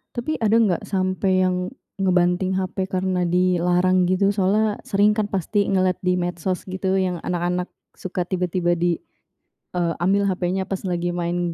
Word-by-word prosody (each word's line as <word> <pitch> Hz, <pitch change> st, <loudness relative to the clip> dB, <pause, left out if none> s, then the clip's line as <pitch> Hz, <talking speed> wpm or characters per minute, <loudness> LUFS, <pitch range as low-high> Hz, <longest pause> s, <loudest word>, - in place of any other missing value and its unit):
Tapi 260 Hz, +6 st, -2 dB
ada 220 Hz, 0 st, +2 dB
nggak 200 Hz, -6 st, +2 dB
sampai 185 Hz, -1 st, +1 dB
yang 180 Hz, +2 st, -1 dB, 0.3 s
ngebanting 180 Hz, 0 st, +2 dB
HP 190 Hz, 0 st, -2 dB
karena 185 Hz, -1 st, 0 dB
dilarang, 180 Hz, +1 st, +2 dB
gitu? 195 Hz, +2 st, +2 dB
Soalnya 205 Hz, +2 st, +1 dB
sering 205 Hz, +1 st, +3 dB
kan 210 Hz, -1 st, -1 dB
pasti 200 Hz, +2 st, 0 dB
ngeliat 185 Hz, -2 st, +1 dB
di 180 Hz, 0 st, +2 dB
medsos, 175 Hz, +1 st, -2 dB
gitu, 190 Hz, +1 st, -1 dB
yang 180 Hz, -2 st, -1 dB
anak-anak 180 Hz, 0 st, -1 dB, 0.3 s
suka 180 Hz, -1 st, -4 dB
tiba-tiba 180 Hz, -1 st, 0 dB
di, 170 Hz, 0 st, +1 dB, 0.8 s
eee, 170 Hz, -2 st, +1 dB
ambil 200 Hz, +2 st, +3 dB
HP-nya 185 Hz, 0 st, -1 dB
pas 195 Hz, -, -3 dB
lagi 175 Hz, -2 st, -1 dB
main 175 Hz, 0 st, -1 dB
185 Hz, 150 wpm, -22 LUFS, 175-190 Hz, 0.8 s, sering